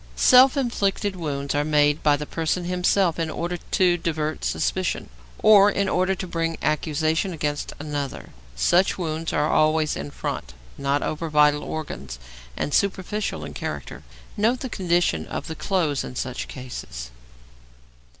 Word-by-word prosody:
Self 255 - +6
inflicted 205 -6 0
wounds 140 -5 -3
are 145 0 +1
made 150 0 +3
by 145 -1 +4
the 150 - -5
person 165 +3 -2
himself 180 -1 +1
in 165 -1 -1
order 175 +2 -3
to 175 0 +2
divert 155 -2 -2
suspicion, 185 -1 -1 0.3
or 205 -1 +8
in 200 -1 0
order 185 +1 +1
to 190 - -5
bring 165 -2 -2
accusation 155 +4 0
against 150 -2 -3
another. 145 -2 -5 0.2
Such 175 - +3
wounds 165 -2 -3
are 150 +1 +1
always 155 0 +2
in 70 +1 -5
front, 65 -3 -5 0.2
not 140 +1 0
over 160 +1 -3
vital 150 -1 +4
organs, 70 - -6 0.4
and 145 - -2
superficial 200 +1 -1
in - - -8
character. - - -6 0.3
Note 230 +4 +1
the 260 - -4
condition 175 - 0
of - - -5
the 160 - -5
clothes 160 -6 0
in - - -8
such 125 0 -4
cases. 120 - -7
160 Hz, 150 wpm, -24 LUFS, 145-185 Hz, 0.4 s, or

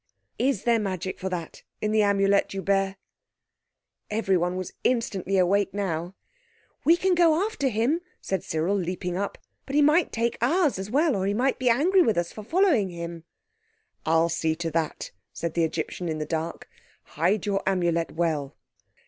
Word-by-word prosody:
Is 255 -6 +1
there 235 -1 +3
magic 185 -3 -3
for 190 - -3
that 170 -3 -5 0.2
in 215 - -1
the 215 0 +3
Amulet 200 -1 +2
you 195 - -3
bear?" 195 0 +1 1.1
Everyone 190 -5 +1
was 185 -1 -5
instantly 195 -6 0
awake 195 +2 +2
by - - -6
now. 175 -2 -2 0.7
"We 335 +2 +5
can 375 +1 +2
go 340 +1 +4
after 425 -11 -1
him," 250 +9 +1 0.2
said 190 -2 -3
Cyril, 160 +5 0
leaping 180 -1 -2
up; 200 +2 -3 0.3
"but 275 - -4
he 295 - +5
might 310 +4 +4
take 235 +1 -1
ours 300 - +2
as 195 +1 -5
well; 295 +4 +2
or 190 0 -1
he 200 - 0
might 255 +4 +1
be 255 -1 +2
angry 340 +11 +4
with 225 - +2
us 175 0 -1
for 215 - -8
following 305 - +2
him." 170 -1 -7 0.8
"I'll 165 +1 +3
see 160 -1 0
to 165 0 -3
that," 160 0 -2 0.2
said 170 -1 -4
the 170 - +1
Egyptian 165 +2 -3
in 155 - -2
the 155 - -3
dark. 160 +1 -4 0.4
"Hide 180 +7 0
your 200 -1 0
Amulet 175 -3 +1
well." 155 -4 -1
195 Hz, 175 wpm, -26 LUFS, 170-240 Hz, 1.1 s, We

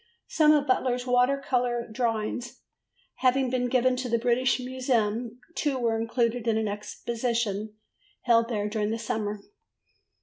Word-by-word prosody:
Some 305 -1 +4
of 290 -2 +2
Butler's 250 -2 +1
water 250 +2 +3
colour 245 -3 -1
drawings 230 +2 -3 0.6
having 260 0 +2
been 250 -1 0
given 255 0 +3
to 250 -1 -3
the 235 - +2
British 245 +2 +2
Museum, 245 -2 -1
two 290 -5 -1
were 230 -2 +1
included 235 0 0
in 220 -1 +2
an 220 -1 0
exhibition 215 0 -3 0.5
held 230 -1 +3
there 210 -3 -1
during 210 0 -1
the 225 - -1
summer. 210 -2 -3
240 Hz, 140 wpm, -27 LUFS, 225-255 Hz, 0.6 s, Some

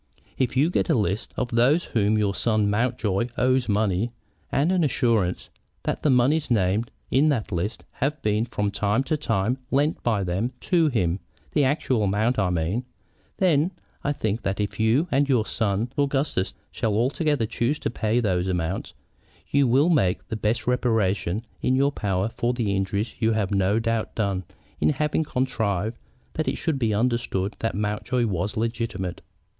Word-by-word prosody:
"If 130 -1 0
you 150 +6 +3
get - - 0
a 160 - +4
list 105 -1 -1
of 125 - -1
those 125 +9 +3
to - - -13
whom 110 -1 +2
your 105 -2 +1
son 110 -1 +1
Mountjoy 115 -2 0
owes 130 -1 +2
money, 105 +1 +1 0.4
and 150 +6 +2
an 185 -2 +2
assurance 115 - +1 0.3
that - - -2
the 150 - +2
moneys 140 +5 +3
named 105 0 +1 0.2
in 140 +5 +4
that 120 -9 -1
list 95 +5 -2 0.2
have 145 +3 0
been 105 +1 +1
from 105 -4 -2
time 105 +5 +1
to 155 - 0
time 125 -4 0
lent 145 +4 +1
by 110 -5 +1
them 95 +8 -1
to 170 -3 +3
him, 95 - 0 0.3
the 150 - +2
actual 130 -3 +1
amount, 110 +5 +1
I 95 -2 +2
mean, 90 +7 -1 0.5
then 175 -1 +2 0.3
I 145 - +1
think 110 -5 -2
that 100 0 -2
if 105 +1 -2
you 115 +10 +3
and 140 +1 +2
your 120 -5 +3
son 110 +3 -1
Augustus 140 -8 0 0.2
shall 115 +4 +1
together 145 -7 +1
choose 120 +5 -1
to - - -3
pay 110 0 0
those 95 -5 0
amounts, 90 0 -2 0.6
you 140 -1 +4
will 135 +7 +4
make 95 - +1
the - - -2
best 110 +1 -1
reparation 110 -4 +1 0.2
in 130 - +2
your 140 +2 +3
power 100 -6 -1
for 120 +1 -1
the 105 -5 0
injury 100 +2 0
you 115 -1 +2
have 105 -3 0
no 100 +1 +2
doubt 115 -1 -1
done 100 -4 -1 0.3
in - - +3
having 150 +2 +1
contrived 115 - -1 0.3
that 155 - -2
it - - 0
should 160 -5 -1
be 115 -3 +1
understood 110 -3 0
that 115 - -1
Mountjoy 105 +4 0
was 95 -1 -2
legitimate." 115 -5 -2
115 Hz, 175 wpm, -25 LUFS, 100-130 Hz, 0.6 s, a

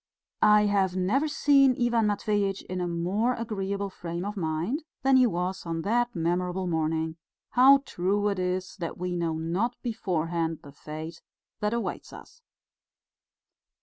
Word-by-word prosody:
I 210 0 +6
have 195 -3 +1
never 210 +12 +1
seen 280 -3 +4
Ivan 235 -2 +2
Matveitch 205 -1 0
in 185 0 -4
a 175 - -1
more 190 +9 0
agreeable 200 -3 -3
frame 170 0 -5
of 205 +1 -4
mind 175 - -2 0.2
than 270 0 +4
he 255 -1 +6
was 180 -1 -2
on 165 -1 -3
that 240 +2 +1
memorable 180 +2 -1
morning 160 -1 -1 0.3
how 270 +2 +6
true 200 +4 0
it 200 -2 -2
is 185 0 -2
that 170 -4 -5
we 180 0 -3
know 170 -2 -1
not 175 +10 -2
beforehand 170 -8 -2
the 140 - -11
fate 155 +3 -8 0.4
that 210 +2 0
awaits 235 - -4
us! 475 - -13
190 Hz, 150 wpm, -27 LUFS, 170-225 Hz, 0.4 s, I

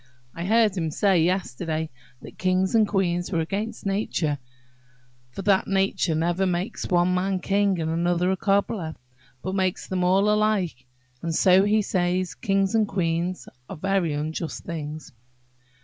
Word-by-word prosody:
I 170 - -5
heard 220 0 +3
him 165 -4 -1
say 185 +2 +2
yesterday, 160 -2 -1 0.3
that - - -12
kings 185 +1 +1
and 220 -2 +4
queens 175 -3 0
were 170 - +1
against 200 +9 -3
nature, 190 -7 -1 0.9
for 160 +10 -7
that 195 -1 +3
nature 195 -4 +1
never 175 +4 +1
makes 180 +5 -2
one 175 0 +3
man 190 +1 0
a - - -1
king 200 -1 +1
and 160 0 -1
another 175 +2 +1
a - - +1
cobbler, 195 -4 0 0.5
but 185 - -3
makes 190 -1 0
them 185 -1 -1
all 190 +3 +3
alike; 210 - +1 0.3
and 165 -1 -2
so 190 +2 +5
he 210 +1 +3
says, 180 -1 0
kings 195 0 0
and 220 -2 +3
queens 175 -1 -1 0.2
are 190 - -6
very 190 -2 0
unjust 155 +2 -4
things." 155 -2 -6
185 Hz, 155 wpm, -25 LUFS, 170-195 Hz, 0.9 s, so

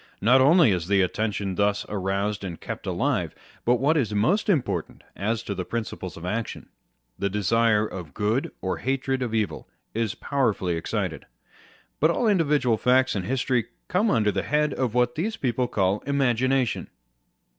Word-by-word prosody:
Not 125 +5 +5
only 150 - +6
is 90 -3 -1
the 100 -1 +3
attention 100 0 -1
thus 100 +2 +1
roused 100 +1 -2
&nd 85 -4 -5
kept - - -6
alive; - - -1 0.3
but 120 - +4
what 145 +6 +2
is 110 -7 0
most 175 - +2
important 100 - -1
as 110 +3 -1
to 100 - -3
the 95 -2 -3
principles 100 -4 -5
of 85 - -8
action, 110 +5 -4 0.5
the 100 - 0
desire 105 +2 +2
of 90 -8 -8
good 110 +5 0
or 95 - -2
hatred 135 0 -1
of 115 -3 -2
evil 110 -3 -2 0.2
is 115 -2 -1
powerfully 115 -10 0
excited. 80 - -3 0.7
But 155 - +4
all 225 +7 +1
individual 150 - +2
facts 130 +3 +3
and 95 -3 -2
history 125 0 0 0.2
come 205 +5 +2
under 105 - +2
the - - -1
head 150 0 +1
of 125 -3 -2
what 125 0 +2
these 215 - -2
people 125 -1 0
call 100 -3 +1
Imagination. 130 -2 +1
115 Hz, 165 wpm, -25 LUFS, 100-135 Hz, 0.7 s, only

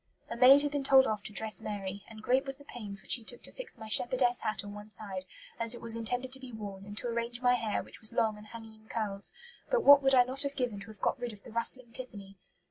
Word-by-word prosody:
A - - -2
maid 265 +4 +7
had 290 - -1
been 285 -1 -2
told 270 -1 +6
off 215 -4 -2
to - - -6
dress 215 +1 -2
Mary, 200 -2 -5
and 215 -1 -12
"great 260 +3 +2
was 270 -1 -3
the 285 - -15
pains 200 -7 -4
which - - -6
she 235 - +3
took 240 +2 -4
to - - -8
fix - - -5
my 220 -1 -9
shepherdess 245 +2 +3
hat 215 0 -2
on 205 0 -8
one 210 +1 -10
side, 195 -2 -7 0.3
as 230 +1 +2
it - - -9
was 230 -1 +1
intended 245 +3 -2
to 265 - -2
be 260 -2 -10
worn, 200 -3 -8
and 205 0 -9
to 245 - -1
arrange 235 0 -3
my 245 0 +3
hair, 225 -4 -1
which - - -12
was 220 - +1
long 220 -1 +1
and 210 0 -13
hanging 225 0 -11
in 220 0 -22
curls; 205 -3 -1 0.4
but - - +2
what 285 0 +9
would 270 -1 +4
I 250 - +7
not 260 +2 -4
have 280 0 -1
given 245 -6 -2
to 200 - -10
have 215 -3 -13
got 265 - 0
rid 240 -2 -4
of 200 - -12
the - - -12
rustling 235 +1 +2
tiffany!" 200 -6 -9
230 Hz, 280 wpm, -31 LUFS, 210-255 Hz, 0.4 s, what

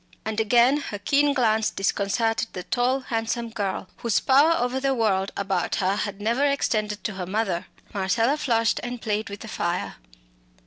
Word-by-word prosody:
And 220 0 -2
again 240 +5 +4
her 250 -8 -5
keen 285 +8 +2
glance 220 -5 +2
disconcerted 210 +4 0
the 180 - -5
tall 250 +6 +1
handsome 230 -1 -2
girl, 200 -4 -3
whose 235 -3 +1
power 285 +5 +5
over 250 +2 0
the 270 0 +1
world 200 -4 +1
about 195 -3 -1
her 190 +1 +1
had 205 -1 -3
never 230 +6 +1
extended 215 -7 0
to 210 - -2
her 185 -2 -5
mother. 190 -3 -1 0.3
Marcella 225 +8 +1
flushed 230 -6 +1
and 245 0 -5
played 215 -1 -2
with 200 0 -8
the - - -8
fire. 175 -4 -3
225 Hz, 170 wpm, -25 LUFS, 200-245 Hz, 0.3 s, power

